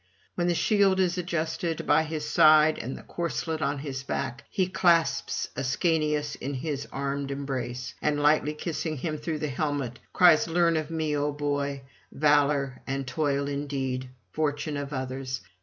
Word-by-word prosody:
When 175 -1 0
the 175 - +2
shield 195 0 +3
is 180 -1 +1
adjusted 165 -1 -2
by - - +4
his 155 -1 -4
side 155 0 +6
and 130 +3 -5
the - - -11
corslet 165 -2 -3
on 145 0 0
his 135 -2 -5
back, 135 0 -4
he 190 - +1
clasps 175 -3 +2
Ascanius 150 +1 0
in 140 +2 -5
his 140 +1 -3
armed 140 +1 -3
embrace, 130 -3 -4
and 150 -1 +1
lightly 150 +1 +3
kissing 155 -1 -3
him 155 +2 -3
through 160 +1 -3
the 150 - -2
helmet, 140 -3 -2
cries: 175 -4 +6
'Learn 170 0 +3
of 155 -1 -1
me, 160 -2 -1
O 145 0 0
boy, 145 -1 -2 0.3
valour 145 -2 +2
[436 135 0 -2
470]and - - -16
toil 140 -2 +1
indeed, 135 -3 -3 0.2
fortune 150 -1 -1
of 140 0 -5
others. 130 -1 -4
150 Hz, 160 wpm, -27 LUFS, 140-160 Hz, 0.3 s, side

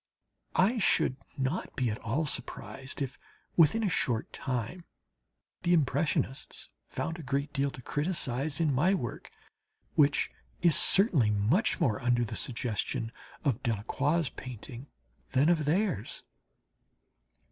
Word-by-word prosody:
I 215 +6 +3
should 130 -8 +3 0.2
not 135 +6 -2
be 125 -4 +1
at 105 - -4
all 135 +8 -1
surprised 135 -1 -2
if, 135 +1 -6 0.4
within 170 +7 +5
a - - +2
short 120 -10 0
time, 130 +7 -3 0.8
the 175 0 +3
impressionists 140 -2 -1 0.2
found 165 +1 -4
a - - -5
great 140 +1 -2
deal 140 0 +1
to 130 -2 -10
criticize 145 -2 0
in 155 -4 +2
my 175 +10 +3
work, 120 - -5 0.6
which 145 -2 +3 0.3
is 170 -3 +6
certainly 180 - +5
much 105 - +2
more 110 -5 +1
under 120 0 +2
the - - -6
suggestion 115 -1 -1 0.3
of 135 -6 +1
Delacroix' 135 +7 0
painting 125 +2 -8 0.5
than 140 +5 +4
of 160 -4 +2
theirs. 165 - 0
140 Hz, 125 wpm, -30 LUFS, 120-165 Hz, 0.8 s, is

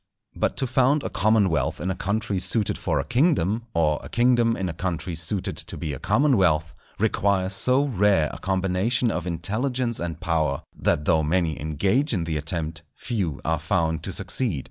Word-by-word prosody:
But - - -1
to - - +1
found 130 +3 +2
a - - -4
commonwealth 100 -8 +2
in 95 - -2
a - - -3
country 100 0 -1
suited 105 +2 +1
for - - -1
a - - 0
kingdom, 120 - +1
or 75 -2 +2
a - - -10
kingdom 120 -1 +3
in 95 - -2
a 85 - -3
country 90 0 -3
suited 85 +4 -1
to - - -8
be 75 - -4
a 70 - -6
commonwealth, 90 - +2 0.2
requires 95 -1 +1
so 130 +8 +3
rare 105 - +2
a - - -8
combination 95 +5 0
of 90 0 -3
intelligence 115 - -1
and 85 -2 -4
power, 80 -6 0
that 75 - 0
though 80 - +3
many 80 -1 0
engage 100 - +1
in 90 -5 0
the 80 -2 -2
attempt, 80 0 -3
few 95 - -3
are 80 0 +1
found 80 -1 0
to 95 - -5
succeed. 100 - -1
95 Hz, 180 wpm, -24 LUFS, 80-115 Hz, 0.2 s, kingdom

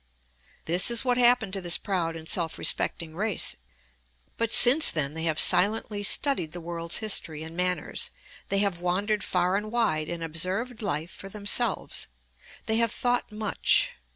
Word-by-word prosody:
This 175 +6 +5
is 235 +2 +1
what 250 -1 0
happened 240 -5 +3
to 195 - -2
this 175 -1 +5
proud 175 -5 -3
and 160 0 -9
self 165 -2 -1
respecting 160 -1 0
race! 205 0 -1 0.8
But 230 -1 -2
since 255 +7 +7
then 150 -3 -3
they 160 +1 -5
have 160 -2 -1
silently 210 +1 +3
studied 205 - +1
the 175 - -8
world's 170 0 -1
history 160 -7 -1
and 160 +1 -10
manners; 180 0 -2 0.4
they 200 - 0
have 185 -4 -3
wandered 195 +4 -2
far 180 +1 -1
and 210 +1 -4
wide 160 -11 -1
and 170 -1 -6
observed 185 +9 -2
life 155 -3 -4
for 195 - -11
themselves. 205 - -1 0.6
They 220 - 0
have 230 -1 0
thought 245 -2 -2
much. 215 0 0
190 Hz, 160 wpm, -25 LUFS, 165-220 Hz, 0.8 s, since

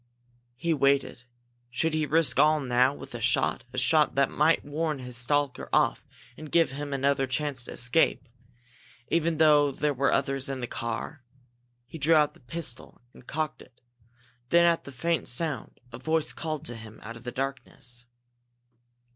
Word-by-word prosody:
He 165 +7 0
waited. 140 -4 +1 0.4
Should 155 +6 0
he 155 -1 0
risk 150 -5 +3
all 155 +1 +5
now, 125 -1 +3
with 145 - -10
a 120 - -6
shot 120 +1 +1
a 130 - -9
shot 150 +3 +3
that 140 0 +2
might 155 +3 +2
warn 150 +1 -2
this 125 -1 -6
stalker 135 +2 0
off - - +2 0.3
and 155 -1 -10
give 165 -4 +3
him 145 +1 -5
another 135 0 +1
chance 135 -1 -2
to - - -7
escape, 130 +2 +1 0.8
even 165 -1 +1
though 150 -2 +5
there 145 +2 -1
were 140 +1 +1
others 135 0 0
in 135 -1 -3
the 125 - -3
car? 115 +5 -5 0.6
He 160 +7 -10
drew 160 +3 +4
out 150 -1 +3
the - - -20
pistol, 135 -1 -4
and 125 - -17
cocked 155 0 -3
it. - - -18 0.7
Then, 170 +3 +5
at 170 -1 +2
the 140 - -8
faint 165 +6 -1
sound, 140 -1 -2
a 115 - -8
voice 160 +3 0
called 155 -3 -4
to 120 - -3
him 110 -1 -11
out 115 +2 -8
of 115 - -11
the 120 - -5
darkness. 125 -2 -5
140 Hz, 170 wpm, -27 LUFS, 125-155 Hz, 0.8 s, all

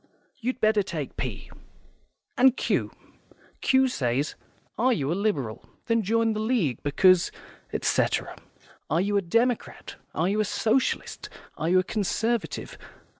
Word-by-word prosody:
You'd 255 +2 -2
better 215 -1 +3
take 160 -7 -5
P. - - -5 0.8
And 260 0 +5
Q. - - 0 0.7
Q 265 0 +4
says 135 - -1 0.4
'Are 255 +3 +2
you 145 - 0
a - - +2
Liberal? 165 - -1 0.2
Then 230 -1 +2
join 225 +2 +1
the 215 - -3
League, 215 - 0
because, 180 +5 +4 0.4
etc. - - 0 0.5
Are 160 - +2
you 205 +3 0
a - - +2
Democrat? 230 +7 -1 0.2
Are 165 - +1
you 205 +3 0
a - - +4
Socialist? 225 +6 0 0.3
Are 160 - -2
you 185 - +4
a 185 - +4
Conservative? 220 +3 -2
205 Hz, 135 wpm, -26 LUFS, 170-230 Hz, 0.8 s, And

